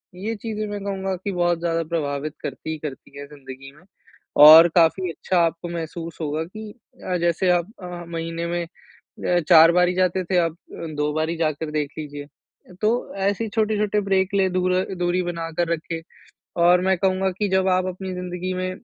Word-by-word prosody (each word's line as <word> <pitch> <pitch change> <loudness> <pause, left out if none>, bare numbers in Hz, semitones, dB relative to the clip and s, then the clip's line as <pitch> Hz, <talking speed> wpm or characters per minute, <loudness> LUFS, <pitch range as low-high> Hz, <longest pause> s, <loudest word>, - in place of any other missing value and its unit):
ये 215 +5 -4
चीजें 215 0 -4
मैं 205 0 -5
कहूँगा 195 -1 -3
कि 190 +3 -5
बहुत 175 -2 +1
ज़्यादा 165 -1 -1
प्रभावित 150 -2 -2
करती 160 - -5
ही 160 - -4
करती 140 -1 -8
है 145 - -7
जिंदगी 135 -1 -11
में। 170 - -20 0.6
और 160 +2 +11
काफ़ी 175 +2 +3
अच्छा 180 +2 -1
आपको 170 +1 -4
महसूस 165 0 -6
होगा 155 +1 -2
कि 215 +3 -9 0.3
अ, 180 -1 -1
जैसे 175 +2 +1
आप 175 -1 +1 0.2
अ, 175 -1 -7
महीने 165 0 -4
में 175 0 -2 0.4
अ, 175 -1 -2
4 165 -1 +8
बारी 180 0 +3
जाते 185 0 +1
थे 180 +1 -1
आप 165 -2 0 0.4
2 150 0 0
बारी 160 +2 -1
जाकर 155 -1 -2
देख 150 -2 -1
लीजिए। 145 -1 -7 0.6
तो 210 - +4 0.3
ऐसे 200 +3 0
छोटे-छोटे 210 -1 0
ब्रेक 195 0 +1
ले 190 -1 +3
दूर 185 0 0 0.3
दूरी 180 +1 0
बनाकर 170 -1 -3
रखे। 165 0 -4 0.6
और 175 +1 +6
मैं 190 0 +2
कहूँगा 190 0 +1
की 205 -1 0
जब 190 0 +2
आप 185 0 +2
अपनी 185 +1 -5
जिंदगी 180 0 -4
में 185 0 -2
175 Hz, 180 wpm, -23 LUFS, 165-190 Hz, 0.6 s, और